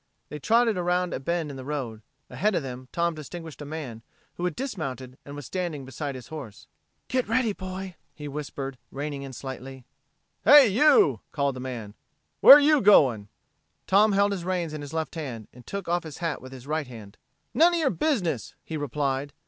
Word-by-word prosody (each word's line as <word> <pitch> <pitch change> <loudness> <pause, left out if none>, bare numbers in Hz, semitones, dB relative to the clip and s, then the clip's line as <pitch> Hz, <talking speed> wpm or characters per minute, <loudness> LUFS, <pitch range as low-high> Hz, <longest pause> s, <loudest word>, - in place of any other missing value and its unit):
They 150 - -6
trotted 230 - +3
around 180 0 0
a - - -2
bend 165 +1 -2
in 135 - -8
the 130 - -7
road. 130 -6 -4 0.3
Ahead 210 0 0
of 160 - 0
them 130 -1 -7
Tom 170 0 0
distinguished 160 +1 -9
a - - -6
man 140 -7 -6 0.3
who 175 - -4
had 180 - -1
dismounted 135 - -5
and 140 - -8
was 145 - -8
standing 170 -7 -4
beside 135 +2 -5
his 125 - -10
horse. 140 -10 -9 0.4
"Get 255 -3 0
ready, 230 -1 +1
boy," 185 -1 -6 0.2
he 150 -1 -7
whispered, 135 -2 -6
reining 140 0 -4
in 135 -1 -7
slightly. 130 0 -8 0.6
"Hey! 290 -5 +8
You!" 215 - +5
called 140 -2 0
the - - -7
man. 120 -5 -6 0.5
"Where're 280 - +11
you 295 0 +4
going?" 130 - +5 0.6
Tom 205 +2 +4
held 200 +1 +3
his 190 -4 -3
reins 175 -3 -2
in 155 - -5
his 145 -1 -8
left 160 -1 -3
hand, 125 -10 -6
and 125 0 -16
took 200 -2 -5
off 175 +1 +1
his 160 -4 -9
hat 165 -4 -3
with 130 - -11
his 130 -1 -11
right 155 -1 -2
hand. 110 -5 -12 0.3
"None 345 +2 +5
of - - +1
your 285 -5 +2
business!" 210 - -1
he 160 - -5
replied. 140 -1 -2
150 Hz, 195 wpm, -26 LUFS, 135-185 Hz, 0.6 s, Where're